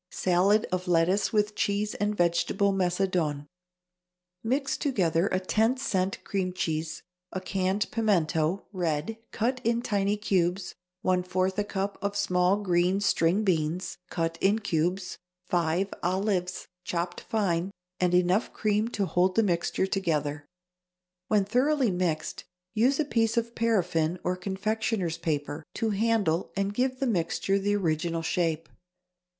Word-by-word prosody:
=Salad 190 +4 +2
of 185 0 -2
Lettuce 175 +3 +2
with 210 -1 +1
Cheese 205 +1 0
and 205 +1 -1
Vegetable 175 +3 +2
Macedoine.= 180 -5 0 1.0
Mix 270 +4 0
together 180 - +1
a 185 - 0
ten 220 +6 +1
cent 195 -7 -1
cream 185 -3 -2
cheese, 160 -3 -3 0.3
a 190 - -3
canned 190 +2 0
pimento 175 -5 +1
(red) 175 +4 -2
cut 250 +3 -1
in 235 +1 +1
tiny 205 -2 +1
cubes, 185 -2 0 0.3
one 185 -1 +2
fourth 185 +2 -1
a - - +2
cup 200 0 -3
of 200 +1 -2
small 180 -1 +2
green 180 +1 +2
string 195 0 +2
beans, 170 -2 -1
cut 165 -1 -2
in 200 +3 +4
cubes, 180 -2 -1 0.3
five 175 +3 0
olives, 185 0 -1 0.2
chopped 175 0 -3
fine, 185 -5 0 0.3
and 180 -1 +2
enough 180 +5 +2
cream 215 0 +1
to 205 -4 -1
hold 185 0 +2
the 225 - +4
mixture 175 -1 0
together. 150 -7 -1 0.8
When 210 -2 +3
thoroughly 255 +2 +2
mixed, 175 -4 -2 0.3
use 250 +6 +2
a 310 - +2
piece 225 -4 +1
of 235 0 0
paraffine 180 -8 +1
or 180 - 0
confectioner's 195 -1 -2
paper 150 -1 -2
to 225 -1 0
handle 205 -5 +1
and 195 +1 -1
give 255 +3 0
the 275 - 0
mixture 195 -2 0
the 205 +1 +1
original 165 -2 -1
shape. 165 -2 0
190 Hz, 135 wpm, -28 LUFS, 175-210 Hz, 1.0 s, in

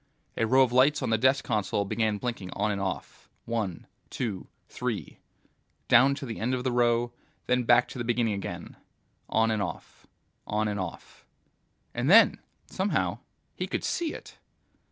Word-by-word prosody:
A 115 - +1
row 130 +3 +6
of 125 - 0
lights 135 +3 +4
on 120 - -1
the 110 - +4
desk 130 +2 +3
console 105 -3 0
began 110 0 0
blinking 115 -5 -4
on 105 +1 0
and 100 -1 -2
off, 95 -2 -5 0.2
one, 110 -7 -3 0.2
two, 110 -7 -4 0.2
three... - - -4 0.7
down 135 +4 +6
to 140 - -6
the 115 -3 -6
end 125 +4 0
of 125 - -4
the 130 - 0
row, 120 0 +2 0.3
then 125 -1 +1
back 120 +1 +5
to 125 - -8
the - - -1
beginning 115 -2 +1
again, 100 - -6 0.5
on 110 0 +2
and 110 -2 0
off, 90 -5 -7 0.4
on 105 +1 0
and 105 -1 -2
off... 95 -3 -7 0.7
And - - -1
then, - - +7 0.3
somehow, 195 +2 -1 0.4
he - - -3
could - - -3
see 335 -3 -1
it! - - -11
115 Hz, 170 wpm, -28 LUFS, 105-125 Hz, 0.7 s, then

